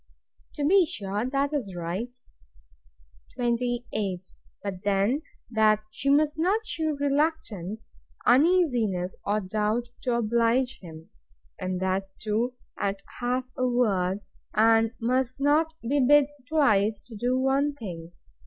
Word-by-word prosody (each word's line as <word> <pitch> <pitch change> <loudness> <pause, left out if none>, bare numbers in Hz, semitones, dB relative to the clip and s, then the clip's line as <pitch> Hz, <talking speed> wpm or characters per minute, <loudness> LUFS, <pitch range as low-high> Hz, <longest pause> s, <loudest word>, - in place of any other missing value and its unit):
To 290 - -1
be 380 +5 +6
sure, 205 -2 -3
that 275 +2 0
is 215 -11 -3
right. 175 +7 -3 1.3
28. 235 -6 -2 0.3
But 195 -3 -4
then, 205 +7 +1 0.3
that 215 -1 +3
she 275 +5 -2
must 300 +2 +3
not 405 +7 +1
shew 315 -7 -2
reluctance, 275 - -1 0.3
uneasiness, 245 - +3
or 210 +1 0
doubt, 215 +5 -1
to 245 -2 0
oblige 235 +3 +1
him; 160 -3 -12 0.5
and 185 0 -2
that 190 +1 -1
too 225 +4 -1 0.2
at 195 0 -2 0.2
half 250 +1 0
a 255 - +1
word; 205 -6 +1 0.3
and 225 +1 +5
must 255 +2 0
not 310 +3 +2
be 280 +5 +1
bid 285 +2 +5 0.2
twice 215 -9 +3
to 230 - -12
do 245 +4 0
one 275 +2 +1
thing. 175 -9 -7
235 Hz, 125 wpm, -27 LUFS, 200-275 Hz, 1.3 s, be